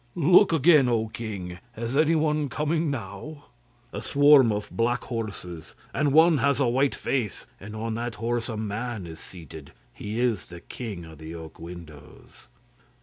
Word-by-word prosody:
'Look 175 +5 +6
again, 155 -4 +5
O 110 -2 0
king! 100 -5 -6 0.2
Is 115 +3 -3
anyone 155 -1 +2
coming 155 +3 0
now?' 140 +5 -6 0.5
'A - - -4
swarm 145 -4 +6
of 105 0 -4
black 120 +2 0
horses, 95 -8 -6 0.2
and 145 0 +1
one 160 +1 +6
has 140 +1 +2
a 135 - +3
white 130 +4 +2
face, 115 -9 -2
and 105 +2 -9
on 110 +1 -3
that 120 0 -3
horse 120 +1 -2
a 110 - -4
man 110 -1 -4
is 80 -1 -9
seated. 80 -4 -11 0.2
He 105 +3 -5
is 120 -6 0
the 85 -1 -10
king 100 -8 -7
of 80 -2 -13
the 80 +1 -8
oak 80 -1 -10
windows. 80 -4 -12
115 Hz, 160 wpm, -26 LUFS, 95-140 Hz, 0.5 s, Look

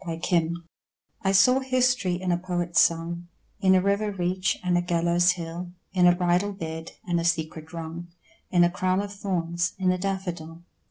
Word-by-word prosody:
SYMBOLS 170 -1 0 0.6
I 195 - +1
saw 250 +7 +5
history 255 -8 +1
in 185 -1 -1
a 175 - +2
poet's 175 -1 0
song, 170 +1 +1 0.3
In 190 -1 +4
a 185 - +4
river 200 +1 +1
reach 185 0 -1
and 180 -1 +1
a 175 - +3
gallows 175 +1 +2
hill, 175 0 -7 0.2
In 180 -2 +5
a 175 - +5
bridal 180 +3 +1
bed, 160 -3 -6
and 175 -1 +1
a - - -2
secret 160 -1 -2
wrong, 165 +1 -6 0.4
In 175 -1 +4
a 175 - +3
crown 185 +1 0
of 200 0 -7
thorns: 170 -4 -2
in 185 -1 +2
a 185 - -1
daffodil. 175 -4 -4
175 Hz, 175 wpm, -26 LUFS, 170-190 Hz, 0.6 s, saw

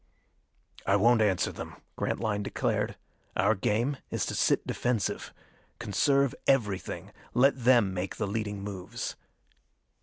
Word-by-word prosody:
"I 100 - +4
won't 115 +3 +5
answer 100 -4 +2
them," - - -7 0.2
Grantline 105 -3 -1
declared. 100 - -1 0.4
"Our 100 +4 +4
game 115 +7 0
is - - -1
to - - -3
sit - - +2
defensive. 120 -4 -1 0.5
Conserve 135 +5 +2
everything. 105 -8 0 0.2
Let 130 -1 +3
them 120 -7 +5
make 95 +1 -3
the 105 - -1
leading 105 -1 -3
moves." 95 -3 -5
110 Hz, 120 wpm, -29 LUFS, 100-120 Hz, 0.5 s, won't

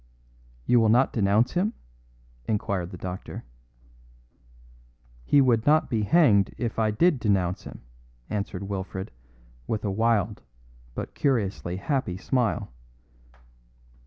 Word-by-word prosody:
"You 125 - +4
will 110 -1 +3
not 125 +4 +4
denounce 105 +2 +2
him?" 200 +6 0 0.7
inquired 100 -4 -1
the 90 - -9
doctor. 90 +1 -6 1.8
"He 140 - +5
would 120 -3 +2
not 155 0 +4
be 110 -2 +1
hanged 105 - +4
if 115 -2 -3
I 110 -1 +2
did 145 +7 +2
denounce 95 -5 0
him," - - -10 0.5
answered 100 -2 -4
Wilfred 95 0 -5 0.6
with 110 -1 -2
a 100 - 0
wild 110 -1 +1 0.5
but - - -5
curiously 100 -9 -1
happy 95 -2 -2
smile. 120 - -1
110 Hz, 115 wpm, -26 LUFS, 95-125 Hz, 1.8 s, He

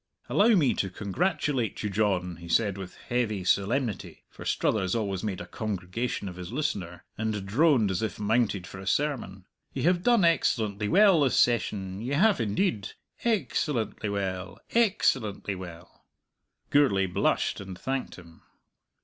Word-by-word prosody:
"Allow 220 +2 +5
me 150 -9 +3
to 95 - -1
congratulate 120 - -1
you, 105 - -1
John," 95 -4 0
he 85 0 -11
said, 100 +3 +2
with 95 -2 -8
heavy 115 -6 -2
solemnity; 105 +5 -1
for - - -11
Struthers 95 -2 0
always 100 -4 -2
made 100 -4 -3
a 85 - -6
congregation 105 +3 -3
of 90 -1 -7
his 90 +1 -7
listener, 100 - -3
and 110 -3 -2
droned 120 -1 +3
as 90 - -1
if 110 -2 -3
mounted 105 -3 +1
for 95 - -10
a 95 - -9
sermon. 120 -11 -1 0.3
"Ye 130 - -3
have 175 +2 +3
done 235 -3 +4
excellently 110 -10 +1
well 195 - +5
this 135 -3 +2
session; 100 -5 +1
ye 125 +5 -3
have 190 - +3
indeed. 110 - -1 0.3
Ex 215 - +1
cellently 115 -7 -2
well 95 -2 -3
ex 225 -4 +4
cellently 105 -5 -5
well!" 90 -1 -11 0.6
Gourlay 130 -10 +4
blushed 95 +2 0
and 95 -2 -8
thanked 135 +4 -3
him. 85 -3 -15
105 Hz, 155 wpm, -27 LUFS, 95-135 Hz, 0.6 s, Allow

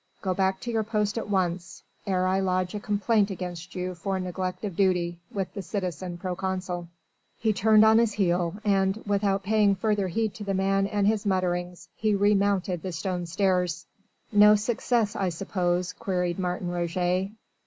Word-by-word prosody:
"Go 190 -2 0
back 190 0 +1
to 240 - -4
your 225 -1 +1
post 210 -1 -1
at 220 - -6
once, 180 -2 -1 0.2
ere 185 -1 +1
I 190 +1 +2
lodge 185 -1 0
a 210 - -3
complaint 205 +1 +1
against 180 -2 -6
you 180 0 -3
for 190 +2 -3
neglect 185 +2 -4
of 195 -4 -4
duty, 175 -3 +1
with 195 -2 -3
the 200 - -4
citizen 180 -2 -4
proconsul." 180 -1 -3 0.5
He 220 -1 +1
turned 215 +2 +5
on 220 +1 +6
his 230 -3 +2
heel 175 -3 +1
and, 195 -1 +2
without 200 -1 +1
paying 205 0 +3
further 205 0 0
heed 215 +3 -1
to 210 - -8
the 195 -1 -1
man 195 +1 +1
and 205 0 0
his 210 0 +1
mutterings, 180 -2 -1
he 215 -1 +1
remounted 200 -3 +2
the 185 - -4
stone 175 +1 -3
stairs. 180 -2 0 0.5
"No 210 0 +7
success, 220 0 0
I 190 -2 0
suppose?" 180 0 -1
queried 180 -2 -2
Martin 180 -1 -2
Roget. 175 +2 0
190 Hz, 170 wpm, -26 LUFS, 180-205 Hz, 0.5 s, No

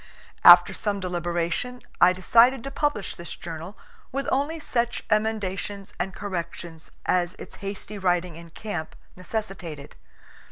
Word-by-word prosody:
After - - +10
some 205 -2 -2
deliberation 175 +6 -2 0.2
I 180 - +8
decided 230 +7 +4
to 275 - -5
publish 290 -8 -1
this 170 - -7
journal, 165 +4 -8 0.3
with 275 +1 -2
only 290 +5 0
such 240 -5 -1
emendations 205 -2 -1
and 190 +2 -1
corrections 170 -4 -6 0.2
as 180 -1 +1
its - - -11
hasty 200 +1 -6
writing 180 -2 +1
in 170 0 -11
camp 175 -3 -5 0.2
necessitated. 185 -6 -5
190 Hz, 125 wpm, -25 LUFS, 175-220 Hz, 0.3 s, After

